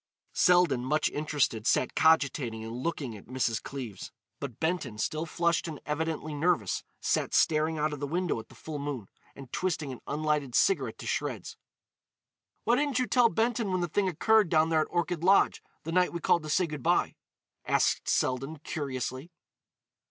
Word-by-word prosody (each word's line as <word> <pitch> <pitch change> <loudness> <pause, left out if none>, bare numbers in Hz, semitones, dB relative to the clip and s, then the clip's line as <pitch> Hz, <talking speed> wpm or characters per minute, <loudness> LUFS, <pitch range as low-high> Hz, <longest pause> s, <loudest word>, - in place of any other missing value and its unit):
Selden, 175 -8 +4
much 150 +4 +1
interested, 145 -7 0
sat 130 - +2
cogitating 140 -8 +2
and 115 +1 -6
looking 130 -3 -3
at 100 - -13
Mrs. 120 -3 -1
Cleves. 125 -8 -7 0.3
But 135 -6 -6
Benton, 160 -9 -1
still 155 +8 -2
flushed 170 0 0
and 155 -3 -6
evidently 155 0 -2
nervous, 145 - 0 0.2
sat - - 0
staring 155 0 +3
out 150 0 0
of 145 - -6
the 145 - -3
window 175 -3 -1
at 110 - -11
the - - -16
full 155 -2 -6
moon, 140 -8 -5 0.3
and 135 -3 -12
twisting 160 -6 -1
an 125 - -9
unlighted 150 -4 -1
cigarette 390 - +2
to - - -9
shreds. - - -3 1.1
"Why 240 - +3
didn't 285 -2 0
you 255 - +2
tell 245 -2 +4
Benton 225 -2 0
when 185 -1 0
the 175 - 0
thing 195 +4 0
occurred 210 +3 +3
down 160 0 +3
there 160 -1 +3
at - - -1
Orchid 175 -1 -1
Lodge, 195 +2 +4 0.2
the 165 - -4
night 180 +1 +3
we 170 - -3
called 170 - +2
to 155 - -7
say 180 +4 +2
good 150 -4 -6
bye?" - - +2 0.5
asked - - +1
Selden, 135 +5 0
curiously. 130 0 -4
155 Hz, 175 wpm, -29 LUFS, 135-175 Hz, 1.1 s, Selden